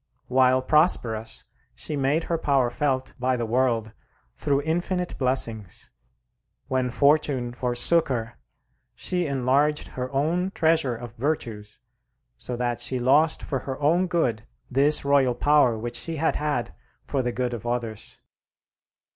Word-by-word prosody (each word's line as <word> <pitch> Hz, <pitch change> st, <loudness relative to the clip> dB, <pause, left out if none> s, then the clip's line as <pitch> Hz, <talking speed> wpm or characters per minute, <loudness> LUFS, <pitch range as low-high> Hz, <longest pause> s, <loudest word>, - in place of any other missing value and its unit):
While 130 Hz, 0 st, +3 dB
prosperous 120 Hz, -7 st, +1 dB, 0.3 s
she 150 Hz, -, -5 dB
made 140 Hz, +4 st, +1 dB
her 165 Hz, -1 st, -2 dB
power 135 Hz, -6 st, +1 dB
felt 130 Hz, -1 st, -1 dB
by 130 Hz, 0 st, +1 dB
the 120 Hz, -, -2 dB
world 115 Hz, -2 st, 0 dB, 0.4 s
through 140 Hz, -1 st, 0 dB
infinite 175 Hz, +3 st, -2 dB
blessings; 115 Hz, -7 st, -1 dB, 0.8 s
when 130 Hz, -1 st, 0 dB
fortune 140 Hz, -2 st, +2 dB
forsook 125 Hz, +7 st, +2 dB
her, 115 Hz, -3 st, -4 dB, 0.6 s
she 180 Hz, -2 st, -1 dB
enlarged 140 Hz, +3 st, +1 dB
her 130 Hz, +1 st, -5 dB
own 165 Hz, +7 st, 0 dB
treasure 160 Hz, -6 st, +2 dB
of 120 Hz, 0 st, -9 dB
virtues, 115 Hz, -6 st, -3 dB, 0.6 s
so 125 Hz, -, -5 dB
that 120 Hz, -1 st, -2 dB
she 130 Hz, -, -1 dB
lost 145 Hz, +6 st, +3 dB
for 135 Hz, -, -2 dB
her 130 Hz, +1 st, -6 dB
own 170 Hz, +6 st, +2 dB
good 125 Hz, -11 st, -1 dB, 0.2 s
this 140 Hz, +3 st, +3 dB
royal 135 Hz, -3 st, +3 dB
power 145 Hz, -6 st, +3 dB
which 120 Hz, +2 st, -4 dB
she 165 Hz, +5 st, -2 dB
had 160 Hz, +1 st, 0 dB
had 145 Hz, -, -2 dB, 0.3 s
for 135 Hz, -, -1 dB
the 125 Hz, -1 st, -2 dB
good 125 Hz, 0 st, -2 dB
of 120 Hz, 0 st, -6 dB
others. 115 Hz, -3 st, -4 dB
130 Hz, 140 wpm, -25 LUFS, 120-150 Hz, 0.8 s, While